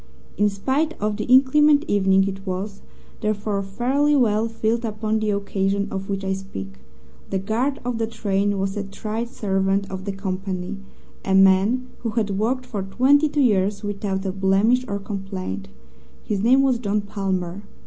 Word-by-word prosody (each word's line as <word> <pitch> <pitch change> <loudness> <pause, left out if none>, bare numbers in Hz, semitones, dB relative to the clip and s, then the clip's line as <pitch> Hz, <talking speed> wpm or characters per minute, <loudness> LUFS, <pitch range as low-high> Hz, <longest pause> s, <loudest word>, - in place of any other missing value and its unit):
In 210 0 +3
spite 265 +11 -1
of 210 0 -1
the 215 - -3
inclement 285 +4 +5
evening 195 -1 +3
it 195 0 -5
was, 195 +1 -4 0.4
therefore, 210 -2 -1
fairly 260 +9 +1
well 225 -4 +3
filled 225 +1 -1
upon 220 0 -1
the 215 -1 -1
occasion 200 0 0
of 195 0 -5
which 195 -1 -2
I 190 0 0
speak. 95 - -7 0.5
The 195 - 0
guard 230 +8 -1
of 245 -2 -2
the 225 - 0
train 205 -2 0
was 195 0 -1
a 205 - -2
tried 215 +4 -4
servant 195 -2 0
of 190 0 -6
the 200 - -2
company 190 0 -4 0.5
a 190 - +1
man 195 +6 +4
who 230 - -3
had 210 -3 +1
worked 255 +4 0
for 210 -5 -4
twenty 265 +10 +3
two 295 0 +1
years 205 -3 +2
without 200 -1 -3
a 190 - 0
blemish 195 +6 +2
or 200 - -2
complaint. 195 - -5 0.6
His 205 -2 -2
name 255 +5 +5
was 260 -3 +2
John 210 -2 0
Palmer. 195 -2 -3
205 Hz, 170 wpm, -23 LUFS, 195-230 Hz, 0.6 s, inclement